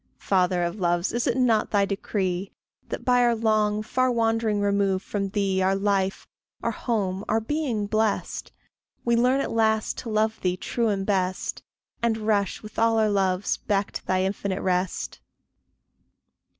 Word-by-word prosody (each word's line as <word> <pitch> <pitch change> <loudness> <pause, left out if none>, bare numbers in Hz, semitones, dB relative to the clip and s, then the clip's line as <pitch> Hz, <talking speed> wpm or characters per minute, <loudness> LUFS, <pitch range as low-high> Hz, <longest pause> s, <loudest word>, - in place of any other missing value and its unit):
Father 180 -2 +1
of 175 +4 -3
loves, 175 0 +1
is 240 0 0
it 245 0 +1
not 235 -4 +3
thy 200 -1 +3
decree 195 -2 -2 0.4
That, - - -5
by 245 -1 +4
our 240 -1 +3
long, 215 -1 +1
far 255 +3 +1
wandering 225 -2 +1
remove 200 -1 +1
From 200 -1 -2
thee, 195 -1 0
our 190 +1 +2
life, 195 -1 0 0.4
our - - +1
home, 200 -5 -2
our 220 - +3
being 240 -3 -1
blest, 215 0 -1 0.5
We 235 0 +3
learn 250 +3 +3
at - - -3
last 220 -1 +1
to 235 - -6
love 220 0 0
thee 180 0 0
true 235 +4 -1
and 195 -2 0
best, 185 -2 -1 0.4
And 230 -1 +1
rush 210 -3 0
with 215 - -7
all 225 0 +3
our 215 -1 +3
loves 190 -1 +1
back 200 -1 -1
to - - -7
thy 185 0 +2
infinite 195 0 -2
rest? 180 0 -1
205 Hz, 165 wpm, -25 LUFS, 190-225 Hz, 0.5 s, by